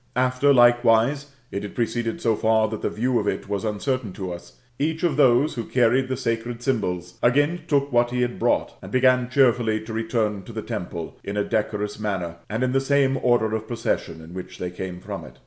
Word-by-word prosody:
After, 130 +3 +3
likewise, 120 +2 +4 0.2
it 100 - -3
had 105 - -7
proceeded 115 -1 -2
so 115 -2 +2
far 110 0 +2
that 110 -1 -5
the - - 0
view 125 +2 0
of 105 - -2
it - - -2
was 100 +1 -2
uncertain 110 0 -2
to 95 -2 -5
us, 85 - -11 0.3
each 160 +3 -1
of 170 -5 +2
those 135 +1 +4
who 115 - -3
carried 125 +2 +2
the 130 -1 -2
sacred 115 -1 -3
symbols, 90 -9 -2
again 145 +7 +2
took 140 -1 +1
what 120 0 +3
he 125 0 0
had 120 0 -3
brought, - - +1
and - - -10
began 130 -1 +3
cheerfully 120 -4 +3
to 110 +1 -8
return 110 -2 -1
to 115 - -11
the 110 -1 -4
temple, 85 -2 -6
in 100 +1 -4
a 105 - +2
decorous 105 0 -2
manner, 95 -5 -3
and 110 +5 -1
in 130 - +1
the 135 +1 +2
same 135 -1 +2
order 120 -3 +2
of 110 0 -5
procession 115 -8 -2
in 80 +2 -12
which 90 0 -8
they 90 -1 -4
came 90 0 -6
from - - -6
it. - - -13
115 Hz, 215 wpm, -24 LUFS, 105-130 Hz, 0.3 s, likewise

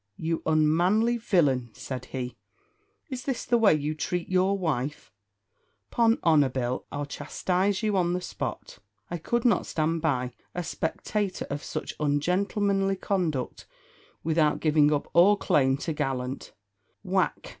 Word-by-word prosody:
"You 165 0 -2
unmanly 175 +10 +3
villain," 145 - +2
said 130 -2 -6
he, 125 -2 -5 0.8
"is 255 -1 -5
this 270 -3 -2
the 240 - +3
way 210 -8 +5
you 150 +1 -2
treat 175 +3 -3
your 185 +2 +2
wife? 150 -8 -3 0.8
'Pon 230 -1 +3
honour, 150 -5 +4
Bill, 125 -1 -3
I'll 145 0 -3
chastise 190 +7 -1
you 210 -2 +1
on 175 -2 +2
the 180 - 0
spot. 180 - -6 0.3
I 175 - -3
could 235 +8 -1
not 230 -7 +3
stand 160 +1 0
by, 125 -6 0 0.2
a 180 - -2
spectator 190 +4 -2
of 145 +1 -3
such - - -5
ungentlemanly 195 +6 +1
conduct 175 -9 -2 0.6
without 155 -1 +2
giving 150 -1 +4
up 145 -1 0
all 195 +5 +6
claim 135 -7 +2
to 160 - -1
gallant 135 -3 -3 0.3
" 95 -1 -44
Whack! - - 0
160 Hz, 145 wpm, -27 LUFS, 145-195 Hz, 0.8 s, all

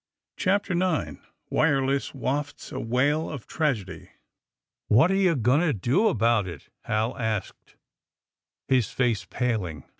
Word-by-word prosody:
CHAPTER 195 0 0
IX 165 - -1 0.3
WIRELESS 140 -3 +1
WAFTS 140 +2 -3
A - - -4
WAIL 145 +7 +1
OF 140 -7 -7
TRAGEDY 130 - -2
TT - - -19 0.8
7 110 - +6
HAT 165 +8 +5
are - - +2
you 185 -4 +3
going 125 +3 +3
to 170 -5 +2
do 130 - +2
about 115 - +2
it?*' 85 -6 -9 0.2
Hal 110 +3 0
asked, 110 -4 -4 0.9
his 130 -5 +2
face 120 -6 0
paling. 105 - -2
130 Hz, 140 wpm, -26 LUFS, 110-155 Hz, 0.9 s, 7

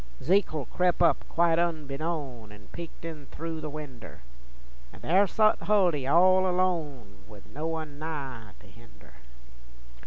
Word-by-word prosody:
Zekle 165 -6 +1
crep' 180 +5 +1
up 170 - +3
quite 170 0 +2
unbeknown 150 -7 -3
An' 105 -1 -15
peeked 170 -1 -9
in 155 -4 -8
thru' 165 -1 -6
the 155 - -5
winder, 145 - -9 0.7
An' - - -15
there 195 +4 +3
sot 215 +2 +3
Huldy 180 -10 +2
all 185 +4 +5
alone, 155 - -1
'ith 100 -2 -14
no 155 +3 -3
one 155 -3 -5
nigh 135 -9 -6
to - - -17
hender. - - -18
160 Hz, 135 wpm, -28 LUFS, 140-175 Hz, 0.7 s, all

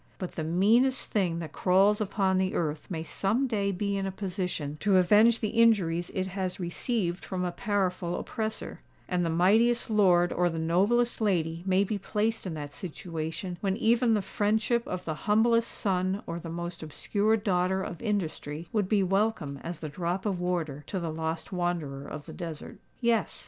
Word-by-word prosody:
But 185 - -5
the 160 - -4
meanest 220 +11 +3
thing 180 -5 +1
that 165 -3 -5
crawls 195 +5 +3
upon 190 -2 +1
the 190 0 0
earth 155 -2 -2
may 160 -4 -3
some 200 - 0
day 205 -5 0
be 200 +1 -1
in 195 0 -1
a - - -2
position 180 -6 -3
to 200 -2 +3
avenge 215 +5 +5
the 215 - 0
injuries 200 -7 +3
it 190 - 0
has 190 -1 -3
received 180 +1 -2
from 180 -1 -3
a 175 - -1
powerful 185 -2 -1
oppressor; 220 -1 -4 0.3
and 180 -1 0
the 165 - 0
mightiest 220 +8 +3
lord 180 -4 +4
or 175 0 +2
the 165 - -4
noblest 200 +10 +2
lady 170 -5 +1
may 190 +1 +4
be 205 +1 -2
placed 215 +1 -1
in 165 - -4
that 145 -1 -6
situation 170 +1 -5
when 195 -1 0
even 235 0 +3
the 205 - 0
friendship 220 +4 0
of 180 0 -4
the 160 - -2 0.2
humblest 230 +2 +4
son 190 0 -1
or 170 0 -4
the 165 - -7
most 170 +1 -5
obscure 205 +8 0
daughter 190 -2 +1
of 175 - -6
industry 170 -7 -3
would 205 -4 +1
be 205 -3 +3
welcome 190 -7 0
as 170 -1 -6
the 155 - -4
drop 175 +5 -3
of 190 -4 -1
water 165 -5 -2
to 190 - -2
the 165 -2 -3
lost 160 +2 -3
wanderer 170 -7 -2
of 150 -1 -7
the - - -9
desert. 165 -4 -7 0.2
Yes! 235 -3 +1
185 Hz, 185 wpm, -28 LUFS, 170-210 Hz, 0.3 s, avenge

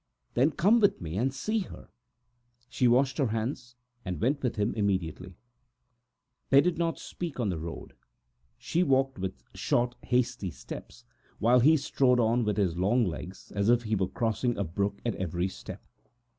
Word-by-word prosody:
"Then 130 +5 +4
come 205 +9 +3
with 205 -2 +3
me 80 -1 -5
and 125 +7 +1
see 215 +12 -1
her." 190 - -8 0.8
She 125 0 +2
washed 130 +3 +3
her 135 - +3
hands, 115 +2 -3 0.3
and 90 -4 -4
went 140 +5 +1
with 125 -3 -1
him 105 +1 0
immediately. 95 -3 -2 1.1
They 135 - +7
did 165 +3 +1
not 165 -1 0
speak 170 -6 -6
on 115 -4 0
the 85 -4 -2
road; 80 +1 -7 0.6
she 170 - -1
walked 135 - +2
with 90 -9 -5
short, 120 0 0
hasty 125 -5 0
steps, 80 - -10 0.3
while 120 +3 +4
he 155 +6 +6
strode 130 -3 +2
on 120 +1 +2
with 105 -1 -1
his 95 -5 +1
long 110 +6 +3
legs, 90 +2 -7
as 100 +2 +1
if 120 0 +4
he 110 -1 0
were 95 -2 0
crossing 120 +1 -1
a 100 - 0
brook 100 +4 -2
at 120 - +1
every 90 0 -1
step. 95 - -9
120 Hz, 170 wpm, -29 LUFS, 95-135 Hz, 1.1 s, They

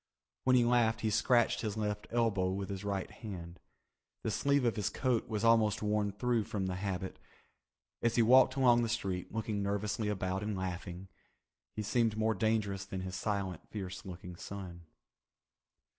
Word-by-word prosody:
When 130 0 +5
he 120 -1 +5
laughed 115 -2 +3
he 110 - 0
scratched 120 +2 +3
his 110 -1 -3
left 105 -1 -2
elbow 110 -6 +1
with 95 0 -4
his 100 0 -4
right 100 -2 -2
hand. 90 -6 -8 0.6
The - - -1
sleeve 140 -2 +2
of 115 - +2
his 105 -1 0
coat 125 -5 0
was 110 -1 -2
almost 110 -2 +4
worn 105 -1 +1
through 115 +2 0
from 100 -3 -2
the 90 -1 -2
habit. 95 -1 -3 0.8
As 115 -1 +1
he 120 - +5
walked 130 +2 +6
along 125 -3 +5
the 115 - 0
street, 95 -6 -2
looking 110 -2 -2
nervously 105 +2 -1
about 95 -1 -1
and 105 -1 -2
laughing, 90 0 -5 0.7
he 105 - -2
seemed 115 0 +1
more 110 0 +2
dangerous 110 -4 0
than 95 -1 -5
his 95 0 -5
silent, 95 -3 -3
fierce 95 -3 -6
looking 90 -1 -8
son. 90 -3 -8
105 Hz, 170 wpm, -33 LUFS, 95-115 Hz, 0.8 s, walked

